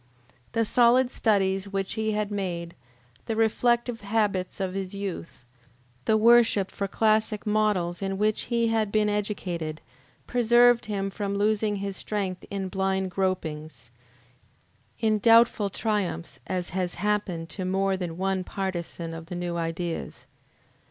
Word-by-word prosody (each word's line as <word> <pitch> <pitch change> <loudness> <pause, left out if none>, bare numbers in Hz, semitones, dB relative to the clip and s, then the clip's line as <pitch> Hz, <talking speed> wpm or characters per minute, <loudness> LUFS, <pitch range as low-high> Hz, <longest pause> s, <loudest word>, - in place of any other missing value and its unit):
The 230 0 +2
solid 245 +3 +4
studies 195 -3 +1
which 195 -1 -2
he 220 0 -1
had 210 0 -1
made, 175 -4 -3 0.5
the 225 - -1
reflective 235 +2 +1
habits 205 -3 -1
of 190 -1 -2
his 195 0 -4
youth, 190 -9 -6 0.6
the 220 - +4
worship 225 -3 +5
for 200 - -3
classic 215 +1 +1
models 210 -5 +1
in 195 0 -2
which 210 +1 +1
he 235 -1 +2
had 220 -2 +1
been 215 0 +2
educated, 180 -7 -3 0.5
preserved 240 0 +4
him 195 -2 -2
from 200 -1 -3
losing 210 0 +1
his 200 -1 -4
strength 195 -4 -3
in 195 -1 -3
blind 190 0 -1
gropings, 155 -9 -3 1.1
in 215 -1 +2
doubtful 230 -2 +5
triumphs, 205 -4 -2
as 180 -1 -2
has 180 0 -2
happened 200 -5 -1
to 190 - -5
more 190 +1 +1
than 175 -3 -5
one 190 0 0
partisan 175 -3 -4
of 165 0 -8
the 180 - -6
new 175 -1 -3
ideas. 165 0 -4
195 Hz, 140 wpm, -26 LUFS, 185-215 Hz, 1.1 s, worship